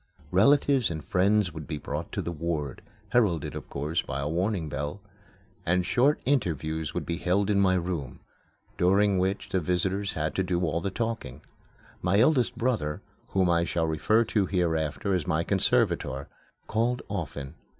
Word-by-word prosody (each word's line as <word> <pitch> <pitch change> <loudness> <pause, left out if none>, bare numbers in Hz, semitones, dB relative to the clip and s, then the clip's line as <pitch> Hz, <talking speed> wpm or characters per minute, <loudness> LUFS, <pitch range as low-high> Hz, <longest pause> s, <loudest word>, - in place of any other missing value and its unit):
Relatives 135 +5 +4
and 80 -3 -5
friends 100 -1 +2
would 80 -1 -7
be 75 -1 -3
brought - - -5
to - - -2
the 85 - -3
ward 80 -4 -3 0.3
heralded, 100 -11 +2
of - - -7
course, 75 +4 -1
by 70 - -4
a 70 - -2
warning 90 +1 -1
bell 75 +5 -4 0.6
and 90 +1 +1
short 135 +9 +3
interviews 80 - 0
would - - -3
be 85 - -2
held 95 +4 +1
in 100 - +3
my 95 -1 +4
room, 85 -7 -3 0.6
during 100 +2 +4
which 95 +2 -1
the 95 - +1
visitors 95 +4 0
had 80 -2 -2
to - - 0
do 90 -1 0
all 85 -1 0
the 100 - -1
talking. 110 - -4 0.6
My 90 +3 +2
eldest 130 0 +3
brother, 110 -12 -1 0.2
whom 95 -1 +2
I 85 -1 +3
shall 85 -1 0
refer 80 +9 +2
to 105 -3 0
hereafter 80 -2 0
as 90 -5 -1
my 80 +1 +1
conservator, 70 -8 +1 0.4
called 120 +3 0
often. 75 -7 -5
90 Hz, 165 wpm, -27 LUFS, 80-100 Hz, 0.6 s, Relatives